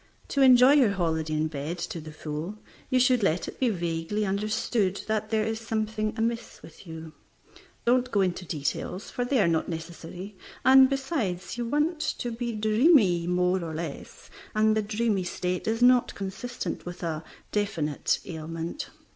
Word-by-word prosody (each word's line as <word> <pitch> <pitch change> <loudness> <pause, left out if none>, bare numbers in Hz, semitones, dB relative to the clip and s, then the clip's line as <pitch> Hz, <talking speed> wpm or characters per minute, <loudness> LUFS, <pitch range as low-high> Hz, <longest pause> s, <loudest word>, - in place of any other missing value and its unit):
To 280 - +1
enjoy 255 0 +8
your 255 -9 +5
holiday 160 -4 -1
in 155 +1 +1
bed 150 +3 -4
to 170 -1 -5
the 155 0 -9
full, 155 +6 -5 0.3
you 255 - +3
should 250 -1 +4
let 180 -3 +1
it - - -8
be 255 - +3
vaguely 175 +2 -2
understood 205 0 0
that 215 0 -1
there 220 -1 +1
is 225 0 -2
something 220 -1 -2
amiss 230 +1 -2
with 170 - -14
you. 160 -1 -8 0.7
Don't 250 +1 +3
go 205 -5 +2
into 185 -1 0
details, 160 +4 -3
for 245 - -2
they 250 +1 +1
are 195 - +4
not 165 -1 +1
necessary; 170 +4 -7 0.3
and, 265 0 +8
besides, 270 - -2
you 240 -1 -3
want 300 +5 +1
to 245 -5 -2
be 235 +1 -3
dreamy 215 - +4
more 180 0 +1
or 160 -1 -5
less, 155 -3 -7 0.2
and 215 0 +4
the 215 - +2
dreamy 210 -2 0
state 180 +1 -3
is 225 +2 +1
not 250 0 +5
consistent 200 +6 -5
with 175 0 -8
a 160 -1 -2 0.3
definite 165 -8 0
ailment. 165 - -5
205 Hz, 165 wpm, -27 LUFS, 170-235 Hz, 0.7 s, enjoy